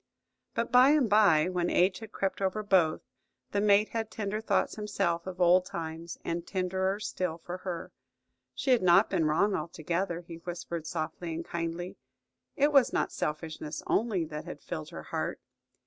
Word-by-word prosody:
But 230 - -1
by 250 +2 +7
and 295 -4 +4
by, 200 -7 +5
when 180 -1 0
age 185 +1 +3
had 220 - -10
crept 195 0 -2
over 195 +2 0
both, 185 -6 +3 0.5
the 200 - +1
mate 205 0 +4
had 225 -1 -3
tender 215 0 -3
thoughts 220 - +1
himself 195 -5 -1
of 185 -1 -6
old 180 +1 +5
times, 165 0 -6
and 170 0 -2
tenderer 190 +1 -1
still 180 -5 -3
for 175 +2 -7
her. 180 -2 -5 0.6
She 265 - 0
had 245 - +5
not 185 +3 +5
been 170 -5 +2
wrong 170 +7 +2
altogether, 170 +2 -2
he 170 -1 -10
whispered 170 -1 -6
softly 165 +1 -4
and 165 +1 -5
kindly. 170 +1 -4 0.6
It 290 +1 +3
was 275 -3 +6
not - - 0
selfishness 155 0 -4
only 205 -7 +1
that 150 -1 -7
had - - -8
filled - - -5
her - - -8
heart. - - -3
180 Hz, 170 wpm, -30 LUFS, 170-205 Hz, 0.6 s, by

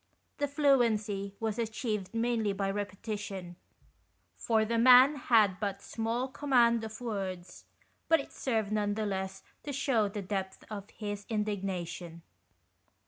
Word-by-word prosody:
The 290 - +1
fluency 225 -9 +2
was 225 0 -2
achieved 220 -3 -2
mainly 230 -3 0
by 195 0 -1
repetition, 200 -2 -5 0.8
for 220 -2 +1
the 230 +1 0
man 255 +4 +8
had 220 -8 +3
but 200 -2 -2
small 230 +4 -2
command 245 -4 +3
of 220 +2 -7
words, 190 -6 -5 0.4
but 325 0 +6
it 275 - -7
served 220 -5 -1
none 205 -1 0
the 215 0 -1
less 190 -1 -3 0.2
to 290 - -5
shew 255 -6 +1
the 200 0 -5
depth 190 0 -4
of 205 -1 -6
his 205 -1 -6
indig 210 -3 -1
nation. 175 -3 -5
215 Hz, 140 wpm, -31 LUFS, 195-235 Hz, 0.8 s, man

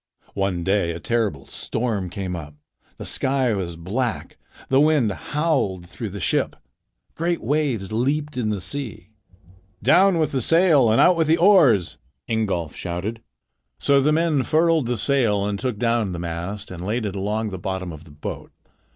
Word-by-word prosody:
One 95 -3 -1
day 95 -2 +1
a 85 - -6
terrible 105 -7 -1
storm 110 -6 -3
came 90 0 -4
up; 75 -3 -8 0.4
the - - -7
sky 130 -3 +1
was 90 -4 -3
black; 105 +8 -3 0.3
the 135 +1 +4
wind 150 -8 +3
howled 100 - -1
through 110 +4 -6
the 100 +1 -7
ship. - - 0 0.6
Great 170 +1 -1
waves 125 -7 -1
leaped 145 +6 -1
in 120 -4 -1
the 105 -2 -1
sea. 110 -4 -6 0.7
"Down 185 - +5
with 155 -2 +1
the 130 - 0
sail 165 -4 +4
and 110 - +3
out 180 - +6
with 165 -2 +2
the 160 +2 +4
oars!" 165 - +4 0.3
Ingolf 100 -9 -1
shouted. 95 +6 -4 0.6
So 140 -1 +3
the 150 +3 +3
men 160 -2 +2
furled 160 -1 +2
the 120 -1 -1
sail 110 -6 +2
and 100 -1 -2
took 125 -5 -2
down 115 -4 0
the - - -4
mast 85 +5 -5
and 90 -1 -7
laid 110 +4 -1
it 100 -1 -4
along 105 +2 -2
the 95 - -6
bottom 95 -1 -4
of 80 -1 -11
the 75 - -15
boat. 75 - -7
110 Hz, 170 wpm, -23 LUFS, 95-140 Hz, 0.7 s, out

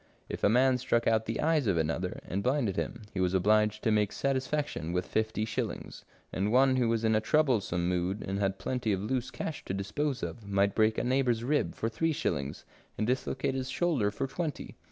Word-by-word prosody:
If - - -5
a - - +5
man 125 +3 +4
struck 120 -1 +1
out 110 -1 +2
the 115 - -2
eye 160 +1 +3
of 105 - +1
another 80 +3 -1
and 95 - -2
blinded 125 -5 +1
him, 115 +3 -3
he 95 - -3
was 90 0 +1
obliged 105 +2 +3
to 110 - +2
make 105 -1 +2
satisfaction 135 - -1
with 90 0 0
fifty 110 0 -1
shillings, 110 -1 -4 0.3
and 100 +3 0
one 130 +1 +4
who 120 -2 +2
was 115 -1 0
in 110 0 +3
a 110 - +3
troublesome 110 - +1
mood 90 +3 -1
and 95 +1 -2
had 95 -1 0
plenty 120 +2 -1
of 95 0 -2
loose 125 +3 -1
cash 125 +4 -5
to 95 - -3
dispose 130 +8 -2
of, 115 - -5
might 100 0 +1
break 110 0 +3
a - - 0
neighbour's 125 -2 +1
rib 145 +4 0
for 110 - -2
three 160 +8 0
shillings, 70 - -2 0.3
and 110 - 0
dislocate 130 +2 -1
his 130 -1 -3
shoulder 140 -8 +1
for 105 - -3
twenty. 155 +2 -4
110 Hz, 210 wpm, -30 LUFS, 100-130 Hz, 0.3 s, a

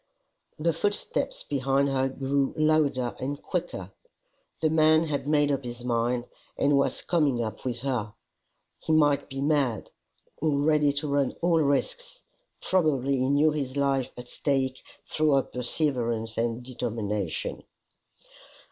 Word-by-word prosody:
The 165 +1 +1
footsteps 205 - -2
behind 135 0 +1
her 135 -1 +1
grew 135 +1 -1
louder 155 -5 +2
and 140 +2 -3
quicker: 165 - -4 0.7
the 155 -1 +1
man 155 0 +5
had 140 -3 -3
made 145 -1 +3
up 140 -1 -1
his 120 0 -7
mind 120 0 0 0.3
and 145 0 +3
was 140 - +1
coming 145 -8 +1
up 110 -1 -6
with 120 -2 -3
her! 125 -6 -2 0.6
He 160 - -1
might 145 -2 +3
be 135 0 -5
mad, 140 -6 0 0.5
or 150 -1 +1
ready 150 0 +3
to 145 +2 -3
run 140 -2 +1
all 170 -2 +4
risks! - - -1 0.4
Probably 140 -7 +1
he 130 +1 +1
knew 145 +2 +4
his 140 -3 -3
life 135 -2 +1
at 125 0 -8
stake 135 -1 -1 0.3
through 155 -2 +2
her 135 - +3
perseverance 120 -4 -2
and 115 +1 -1
determination! 110 -7 -3
140 Hz, 140 wpm, -27 LUFS, 125-150 Hz, 0.7 s, man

